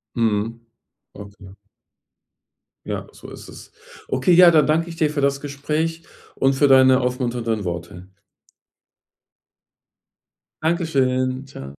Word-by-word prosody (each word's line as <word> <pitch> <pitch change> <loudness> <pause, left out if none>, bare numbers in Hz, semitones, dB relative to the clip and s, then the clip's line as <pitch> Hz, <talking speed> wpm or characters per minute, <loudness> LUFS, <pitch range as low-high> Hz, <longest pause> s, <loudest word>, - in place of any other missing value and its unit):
Mhm, 115 0 -1 0.5
okay. 100 -1 -13 1.3
Ja, - - -5
so - - -13
ist - - -12
es. - - -13 0.4
Okay, 130 +7 0
ja, 175 0 +8
dann 155 -2 +4
danke 165 +2 0
ich 165 - -8
dir 155 -2 +1
für 145 -2 -3
das 140 0 +1
Gespräch 155 +4 -3 0.3
und 135 0 +2
für 145 +2 +2
deine 130 -1 +5
aufmunternden 120 -4 -2
Worte. 85 +1 -7 2.6
Dankeschön. 135 -6 0
Tschau. 70 - -10
130 Hz, 110 wpm, -21 LUFS, 115-155 Hz, 2.6 s, ja